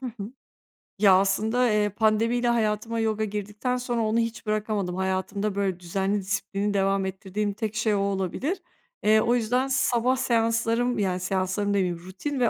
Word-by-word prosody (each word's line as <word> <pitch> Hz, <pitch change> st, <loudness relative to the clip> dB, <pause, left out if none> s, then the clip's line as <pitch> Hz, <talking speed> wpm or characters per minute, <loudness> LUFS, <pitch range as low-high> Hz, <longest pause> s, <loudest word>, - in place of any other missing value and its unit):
Hı 260 Hz, -, -5 dB
hı. 220 Hz, -2 st, -7 dB, 0.7 s
Ya, 200 Hz, -2 st, +6 dB
aslında, 220 Hz, +6 st, +1 dB
eee, 210 Hz, -1 st, +2 dB
pandemiyle 225 Hz, +3 st, +1 dB
hayatıma 225 Hz, -1 st, 0 dB
yoga 220 Hz, -1 st, 0 dB
girdikten 210 Hz, +4 st, -3 dB
sonra 245 Hz, -2 st, -2 dB
onu 220 Hz, +1 st, +1 dB
hiç 230 Hz, -1 st, -3 dB
bırakamadım. 210 Hz, -4 st, -1 dB
Hayatımda 190 Hz, +2 st, -2 dB
böyle 195 Hz, -3 st, -1 dB
düzenli, 195 Hz, +3 st, -1 dB
disiplinli 200 Hz, +1 st, -2 dB
devam 195 Hz, 0 st, +1 dB
ettirdiğim 195 Hz, +2 st, -3 dB
tek 220 Hz, 0 st, -4 dB
şey 220 Hz, -2 st, +1 dB
o -, -, +1 dB
olabilir. 200 Hz, -, -2 dB, 0.4 s
Eee, 215 Hz, +1 st, +5 dB
o 235 Hz, +2 st, +2 dB
yüzden 245 Hz, +3 st, +1 dB
sabah 255 Hz, -1 st, +2 dB
seanslarım, 230 Hz, -1 st, +1 dB
yani, 185 Hz, -3 st, 0 dB
seanslarım 185 Hz, +2 st, -1 dB
demeyeyim, 180 Hz, -4 st, 0 dB
rutin 190 Hz, -, -5 dB
ve 240 Hz, -2 st, +3 dB
210 Hz, 160 wpm, -26 LUFS, 195-230 Hz, 0.7 s, Ya